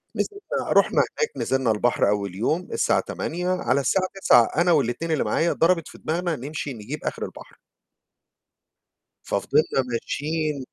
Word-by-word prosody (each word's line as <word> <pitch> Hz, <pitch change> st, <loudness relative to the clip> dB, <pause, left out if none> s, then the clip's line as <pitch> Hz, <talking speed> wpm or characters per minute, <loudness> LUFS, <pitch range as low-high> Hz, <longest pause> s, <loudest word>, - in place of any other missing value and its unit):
نزلنا 410 Hz, +5 st, -3 dB
رُحنا -, -, +3 dB
هناك، 460 Hz, -, -1 dB
نزلنا 130 Hz, -3 st, +1 dB
البحر 110 Hz, 0 st, +2 dB
أول 100 Hz, -3 st, -1 dB
يوم 155 Hz, -, -1 dB
الساعة -, -, +2 dB
08:00 180 Hz, +3 st, -3 dB
على 140 Hz, -7 st, +1 dB
الساعة 185 Hz, +8 st, +1 dB
09:00 120 Hz, -, +7 dB, 0.2 s
أنا 175 Hz, 0 st, +3 dB
وال2 150 Hz, +2 st, +1 dB
اللي 155 Hz, -, +1 dB
معايا، 170 Hz, +1 st, +1 dB
ضربت 165 Hz, -1 st, +2 dB
في -, -, -12 dB
دماغنا 170 Hz, +1 st, -2 dB
نمشي 145 Hz, +1 st, -5 dB
نجيب 105 Hz, -3 st, -7 dB
آخر -, -, -3 dB
البحر. -, -, -12 dB, 1.6 s
ففضلنا 135 Hz, -, +1 dB
ماشيين 150 Hz, +3 st, -2 dB
155 Hz, 140 wpm, -24 LUFS, 125-175 Hz, 1.6 s, 09:00